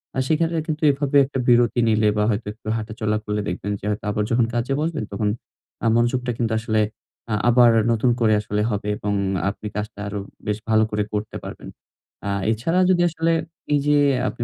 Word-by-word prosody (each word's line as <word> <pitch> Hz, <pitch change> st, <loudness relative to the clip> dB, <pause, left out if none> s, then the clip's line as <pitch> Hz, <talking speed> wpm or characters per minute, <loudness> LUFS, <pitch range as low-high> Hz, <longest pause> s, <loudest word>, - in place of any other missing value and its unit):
আ -, -, 0 dB
সেখানে 165 Hz, +1 st, +1 dB
কিন্তু 155 Hz, 0 st, -3 dB
এভাবে 140 Hz, 0 st, +1 dB
একটা 135 Hz, 0 st, -4 dB
বিরতি 120 Hz, 0 st, +4 dB
নিলে 110 Hz, -1 st, +3 dB
বা 105 Hz, -, +2 dB
হয়তো 110 Hz, 0 st, -2 dB
একটু 110 Hz, 0 st, -16 dB
হাঁটাচলা 110 Hz, -1 st, -2 dB
করলে 105 Hz, 0 st, -2 dB
দেখবেন, 100 Hz, -, -3 dB
যে -, -, -9 dB
হয়তো 105 Hz, 0 st, -3 dB
আবার 105 Hz, -, 0 dB
যখন 115 Hz, 0 st, +3 dB
কাজে 120 Hz, +3 st, -1 dB
বসবেন 160 Hz, -5 st, -2 dB
তখন 105 Hz, +1 st, 0 dB, 0.5 s
আ -, -, 0 dB
মনোযোগটা 120 Hz, +1 st, +1 dB
কিন্তু 115 Hz, -2 st, -1 dB
আসলে 110 Hz, -1 st, 0 dB, 0.5 s
আ -, -, +1 dB, 0.2 s
আবার 120 Hz, 0 st, +6 dB, 0.2 s
নতুন 115 Hz, +2 st, +2 dB
করে 110 Hz, -2 st, +3 dB
আসলে 105 Hz, 0 st, -2 dB
হবে। 105 Hz, -1 st, -3 dB
এবং 105 Hz, -1 st, -2 dB, 0.4 s
আপনি 105 Hz, +1 st, -6 dB
কাজটা 105 Hz, 0 st, -5 dB
আরো 100 Hz, 0 st, -4 dB, 0.3 s
বেশ 105 Hz, -1 st, 0 dB
ভালো 110 Hz, 0 st, +4 dB
করে 105 Hz, 0 st, 0 dB
করতে 105 Hz, 0 st, -3 dB
পারবেন। -, -, -8 dB, 0.6 s
আ -, -, -1 dB, 0.2 s
এছাড়া 145 Hz, +11 st, 0 dB
যদি 180 Hz, -2 st, +3 dB
আসলে, 165 Hz, 0 st, 0 dB, 0.4 s
এই 145 Hz, -, +4 dB
যে 145 Hz, -, +4 dB, 0.3 s
আপনি 120 Hz, -1 st, -4 dB
115 Hz, 190 wpm, -22 LUFS, 105-130 Hz, 0.6 s, আবার